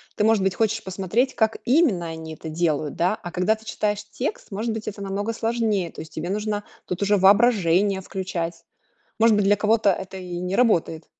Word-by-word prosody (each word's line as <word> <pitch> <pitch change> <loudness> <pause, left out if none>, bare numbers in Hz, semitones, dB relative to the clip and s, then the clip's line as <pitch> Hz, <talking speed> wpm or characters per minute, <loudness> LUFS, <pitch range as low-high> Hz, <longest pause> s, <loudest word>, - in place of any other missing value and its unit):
Ты, 210 - 0
может 220 -3 +3
быть, 195 - +1
хочешь 225 +2 0
посмотреть, 195 +7 0
как 220 -1 +1
именно 245 - +3
они 160 -1 -7
это 160 - -8
делают, 155 -3 -1
да. 180 +5 +1
А 175 -4 -9
когда 185 +5 +1
ты 220 - -18
читаешь 210 -1 -2
текст, 210 +3 -4
может 220 +4 -2
быть, 220 -1 -6
это 205 -1 -5
намного 200 +3 -2
сложнее. 225 -5 0
То - - -9
есть 160 -1 -11
тебе 165 +4 -4
нужно 210 0 -2 0.2
тут 180 +1 -4
уже 205 0 +3
воображение 195 -2 +4
включать. 180 -3 -4 0.6
Может 225 0 +5
быть, 205 - +2
для 205 +1 +4
кого-то 215 0 +3
это 190 +1 -6
и 180 -2 -6
не 180 +2 -2
работает. 170 -9 +2
200 Hz, 200 wpm, -23 LUFS, 180-220 Hz, 0.6 s, Может